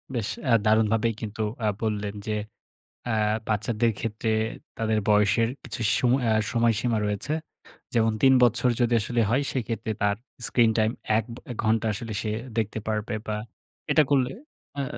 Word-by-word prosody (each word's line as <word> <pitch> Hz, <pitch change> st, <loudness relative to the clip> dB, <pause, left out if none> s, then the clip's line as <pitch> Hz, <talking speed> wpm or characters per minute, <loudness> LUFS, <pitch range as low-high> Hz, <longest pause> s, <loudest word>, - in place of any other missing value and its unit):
বেশ 110 Hz, -3 st, -1 dB, 0.2 s
অ্যা 125 Hz, -4 st, +2 dB
দারুণভাবেই 110 Hz, +1 st, +3 dB
কিন্তু 110 Hz, 0 st, -5 dB, 0.2 s
আ -, -, +3 dB, 0.2 s
বললেন, 105 Hz, -2 st, -1 dB
যে 110 Hz, -, 0 dB, 0.7 s
অ্যা 115 Hz, -2 st, 0 dB, 0.3 s
বাচ্চাদের 110 Hz, +2 st, +1 dB
ক্ষেত্রে 110 Hz, 0 st, -2 dB, 0.5 s
তাদের 110 Hz, -1 st, +1 dB
বয়সের 105 Hz, +2 st, +4 dB
কিছু -, -, -5 dB, 0.2 s
সময় 130 Hz, 0 st, +2 dB
আ -, -, +2 dB, 0.2 s
সময়সীমা 115 Hz, 0 st, +2 dB
রয়েছে। 105 Hz, +8 st, -1 dB, 0.6 s
যেমন 115 Hz, -1 st, +3 dB
৩ 135 Hz, 0 st, +6 dB
বছর 120 Hz, +1 st, +4 dB
যদি 120 Hz, 0 st, +2 dB
আসলে 120 Hz, +2 st, 0 dB
হয়, 135 Hz, +5 st, +2 dB
সেইক্ষেত্রে 115 Hz, -3 st, -3 dB
তার 100 Hz, 0 st, +2 dB, 0.3 s
স্ক্রিন-টাইম 110 Hz, -2 st, +3 dB, 0.3 s
১ 115 Hz, -, +1 dB, 0.3 s
এ -, -, -3 dB
ঘন্টা 110 Hz, +1 st, +2 dB
আসলে 115 Hz, +1 st, -5 dB
সে 110 Hz, -, -2 dB, 0.3 s
দেখতে 110 Hz, -1 st, -1 dB
পারবে 110 Hz, 0 st, -2 dB
বা 105 Hz, -, -1 dB, 0.6 s
এটা 155 Hz, -, +6 dB
করলে 130 Hz, -2 st, +2 dB, 0.5 s
আ -, -, +1 dB
আ -, -, -1 dB
110 Hz, 150 wpm, -26 LUFS, 110-120 Hz, 0.7 s, ৩